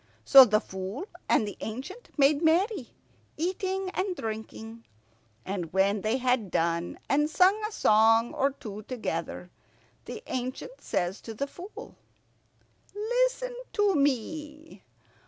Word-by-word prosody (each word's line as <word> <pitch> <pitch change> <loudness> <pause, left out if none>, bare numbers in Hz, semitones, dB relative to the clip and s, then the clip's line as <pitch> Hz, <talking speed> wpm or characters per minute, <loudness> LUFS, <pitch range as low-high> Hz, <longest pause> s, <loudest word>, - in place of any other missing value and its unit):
So 270 -2 +10
the 215 -2 +3
Fool 190 - -6 0.2
and 215 - +3
the 205 - -7
ancient 275 - -7
made 285 +1 +4
merry, 340 - +2 0.5
eating 375 +2 -2
and 375 -1 -2
drinking; 225 -1 -6 0.6
and 180 -4 -4
when 195 +2 +2
they 220 +5 +1
had 250 -5 +1
done, 170 0 -1
and 295 +2 +2
sung 380 +6 +4
a 425 - -4
song 225 - +4
or 275 - +2
two 215 -6 -8
together, 180 -7 -4 0.5
the 445 - -7
ancient 260 - -5
says 175 +3 -2
to 225 - -8
the 280 - -1
Fool, 360 +8 -10 1.0
"Listen - - 0 0.2
to 415 -2 +3
me. 300 +3 -2
265 Hz, 125 wpm, -28 LUFS, -, 1.0 s, So